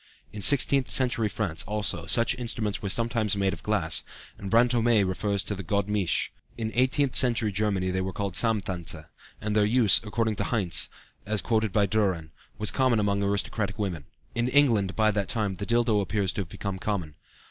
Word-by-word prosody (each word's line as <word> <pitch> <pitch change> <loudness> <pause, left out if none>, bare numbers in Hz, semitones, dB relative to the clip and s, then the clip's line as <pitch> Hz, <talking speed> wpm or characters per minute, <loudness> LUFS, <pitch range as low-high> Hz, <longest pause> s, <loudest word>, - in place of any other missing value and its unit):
In 105 - -7
sixteenth 135 +1 +4
century 120 -4 +2
France, 90 -6 -2
also, 100 -5 -2
such 115 +4 +2
instruments 115 -4 -3
were 100 - -3
sometimes 115 -1 0
made 100 -1 0
of - - -8
glass, 80 -7 0 0.3
and 100 - -7
Brantôme 115 -2 +3
refers 100 +1 -1
to - - -3
the 95 - -6
godemiche; 100 +1 -1 0.3
in 110 -1 -3
eighteenth 130 +2 +1
century 115 -4 +3
Germany 95 -2 -1
they 95 0 -1
were 95 0 -3
called 100 0 -4
Samthanse, 90 -7 -1 0.3
and 105 0 -3
their 105 - +4
use, 110 -2 +5
according 110 0 -1
to - - -1
Heinse, 100 -8 +1 0.4
as 105 0 -1
quoted 110 -1 0
by 105 +1 +2
Dühren, 95 -6 -1 0.3
was 105 -1 +4
common 130 -4 +2
among 100 -1 0
aristocratic 100 0 -1
women. 90 -8 -4 0.3
In 120 +1 0
England 120 -8 +3
by 110 -1 +3
that 100 -2 -2
time 105 -5 -1
the 100 - -5
dildo 115 -3 +2
appears 100 -1 -1
to 105 - -2
have 90 - -7
become 95 +2 -5
common. 90 -7 -3
105 Hz, 180 wpm, -26 LUFS, 95-115 Hz, 0.4 s, use